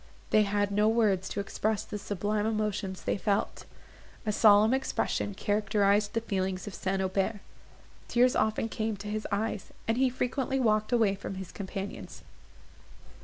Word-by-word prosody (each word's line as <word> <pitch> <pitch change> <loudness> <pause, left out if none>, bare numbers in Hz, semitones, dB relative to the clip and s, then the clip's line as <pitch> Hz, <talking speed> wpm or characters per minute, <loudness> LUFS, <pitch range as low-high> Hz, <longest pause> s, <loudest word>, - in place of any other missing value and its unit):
They 215 - +6
had 205 0 0
no 210 +1 +3
words 215 -5 +2
to - - -4
express 210 +1 -1
the 210 - -6
sublime 205 +2 -1
emotions 210 -3 -2
they - - 0
felt. 200 -1 -1 0.6
A 215 - +1
solemn 210 +2 +6
expression 260 -6 -1
characterised 205 0 +1
the 230 - +1
feelings 190 -3 -2
of 205 - -7
St. 190 0 -1
Aubert; 195 +3 0 0.7
tears 245 +1 +3
often 220 +1 +1
came 220 -1 -2
to 205 +2 -8
his 215 +1 -3
eyes, 210 0 -2 0.2
and 225 +2 +1
he 265 -1 +4
frequently 255 +2 -1
walked 215 -3 +2
away 225 -5 +3
from 195 0 -6
his 190 -2 -7
companions. 195 0 -6
210 Hz, 155 wpm, -29 LUFS, 200-220 Hz, 0.7 s, They